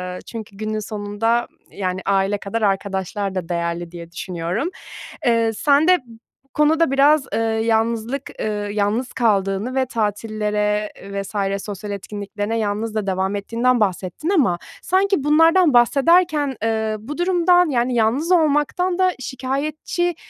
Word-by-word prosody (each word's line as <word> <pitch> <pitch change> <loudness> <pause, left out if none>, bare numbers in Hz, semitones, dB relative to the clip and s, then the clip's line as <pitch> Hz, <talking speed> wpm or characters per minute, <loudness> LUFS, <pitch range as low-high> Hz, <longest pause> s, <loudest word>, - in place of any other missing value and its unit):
Iıı, - - -8
çünkü 215 -4 -9
günün 215 0 -3
sonunda 215 +3 -1 0.2
yani 185 -1 -3
aile 195 +1 +1
kadar 220 +3 -4
arkadaşlar 195 -1 -1
da 180 -2 -4
değerli 170 0 -2
diye 170 -1 -10
düşünüyorum. 180 - -3 0.6
Eee, 230 -1 +2
sen 290 +7 +3
de 365 0 +6
bu 225 -1 -15 0.4
konuda 315 0 +3
biraz, 280 +1 +4
ııı, 225 - +1 0.2
yalnızlık, 230 +4 0
ııı, 205 -1 -2
yalnız 210 +5 -1
kaldığını 205 +1 0
ve 260 -1 +2
tatillere 210 -2 -1 0.2
vs. 195 0 -2
sosyal 205 0 -6
etkinliklerine 205 +2 -4
yalnız 215 +1 -2
da 210 -2 -2
devam 190 +1 0
ettiğinden 235 +4 +1
bahsettin. 190 - -1
Ama 260 - +3 0.2
sanki 385 -4 +1
bunlardan 325 +1 +5
bahsederken, 290 +3 +3
ııı, 220 -1 0
bu 290 +9 -7
durumdan 355 -1 +3
yani 245 -1 0
yalnız 245 +10 +1
olmaktan 340 +3 +2
da 370 0 +4
şikâyetçi, 295 +7 -2
225 Hz, 135 wpm, -21 LUFS, 200-285 Hz, 0.6 s, de